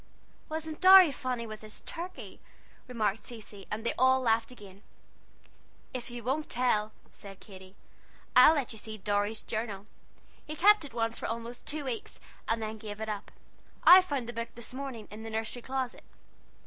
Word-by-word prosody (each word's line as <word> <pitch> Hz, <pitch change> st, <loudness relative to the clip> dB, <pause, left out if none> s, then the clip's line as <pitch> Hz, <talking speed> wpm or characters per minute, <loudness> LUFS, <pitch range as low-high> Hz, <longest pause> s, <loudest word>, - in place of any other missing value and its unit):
"Wasn't 315 Hz, 0 st, -5 dB
Dorry 375 Hz, -3 st, +9 dB
funny 255 Hz, -3 st, -3 dB
with 215 Hz, -1 st, -8 dB
his 215 Hz, 0 st, -9 dB
turkey?" 355 Hz, +2 st, -7 dB, 0.5 s
remarked 220 Hz, -4 st, -1 dB
Cecy; 210 Hz, -4 st, -9 dB
and 220 Hz, +2 st, -4 dB
they -, -, +1 dB
all 260 Hz, 0 st, +5 dB
laughed 230 Hz, -1 st, +1 dB
again. 200 Hz, -5 st, -14 dB, 1.1 s
"If 250 Hz, -2 st, -5 dB
you 240 Hz, -1 st, -8 dB
won't 275 Hz, +6 st, -1 dB
tell," 220 Hz, -4 st, +1 dB, 0.2 s
said 195 Hz, -1 st, -11 dB
Katy, 190 Hz, -2 st, -14 dB, 0.6 s
"I'll 255 Hz, +6 st, +8 dB
let 280 Hz, -5 st, -1 dB
you 220 Hz, -, -7 dB
see 215 Hz, 0 st, -8 dB
Dorry's 205 Hz, +1 st, -1 dB
journal. 215 Hz, -3 st, -4 dB, 0.6 s
He 305 Hz, -, -5 dB
kept 415 Hz, +4 st, +5 dB
it 270 Hz, -5 st, -10 dB
once 230 Hz, -1 st, -1 dB
for -, -, -3 dB
almost 230 Hz, +1 st, -6 dB
two 295 Hz, -1 st, -4 dB
weeks, 240 Hz, -4 st, -5 dB, 0.3 s
and 225 Hz, 0 st, 0 dB
then 220 Hz, 0 st, -5 dB
gave 210 Hz, -1 st, -8 dB
it 220 Hz, 0 st, -4 dB
up. 205 Hz, -1 st, -5 dB, 0.5 s
I 370 Hz, +1 st, +10 dB
found 280 Hz, -9 st, -3 dB
the 240 Hz, -, -6 dB
book, 230 Hz, 0 st, -4 dB
this 235 Hz, +1 st, -7 dB
morning, 260 Hz, -5 st, -6 dB
in 215 Hz, +1 st, -9 dB
the 225 Hz, -, -7 dB
nursery 225 Hz, +2 st, -3 dB
closet." 260 Hz, 0 st, -4 dB
230 Hz, 175 wpm, -30 LUFS, 215-260 Hz, 1.1 s, I